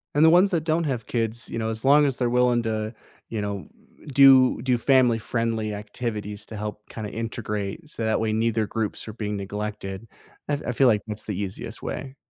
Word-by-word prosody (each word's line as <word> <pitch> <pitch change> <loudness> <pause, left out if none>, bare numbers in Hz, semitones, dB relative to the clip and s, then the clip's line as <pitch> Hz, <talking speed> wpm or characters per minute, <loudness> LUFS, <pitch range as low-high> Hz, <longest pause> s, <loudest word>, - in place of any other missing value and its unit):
And 150 +2 +6
the - - +8
ones 180 +4 +5
that 165 -4 +1
don't 165 +1 +1
have 125 -6 -2
kids, 115 0 -2
you - - -4
know, 110 -1 -1
as 110 +2 -4
long 145 +2 +6
as 135 -3 0
they're 125 -2 +1
willing 125 -1 +3
to, 110 0 -2 0.4
you 110 -2 -3
know, 100 -1 -4 0.5
do 130 -3 +7
do 125 -2 +2
family 125 -2 +4
friendly 115 -1 -1
activities 105 0 -5
to 110 - -7
help 105 0 -6
kinda 110 -2 -6
integrate 110 +4 -4
so 115 - -4
that 110 0 +1
way 110 -1 0
neither 110 0 +1
groups 110 0 -3
are 110 - -6
being 105 -2 -3
neglected, 100 0 -5 0.4
I - - +1
f 145 - -1
I - - +1
feel 130 +2 +4
like 105 -3 +4
that's 105 0 -4
the 105 -3 -4
easiest 100 -2 -5
way. 135 0 -5
115 Hz, 210 wpm, -25 LUFS, 105-125 Hz, 0.5 s, the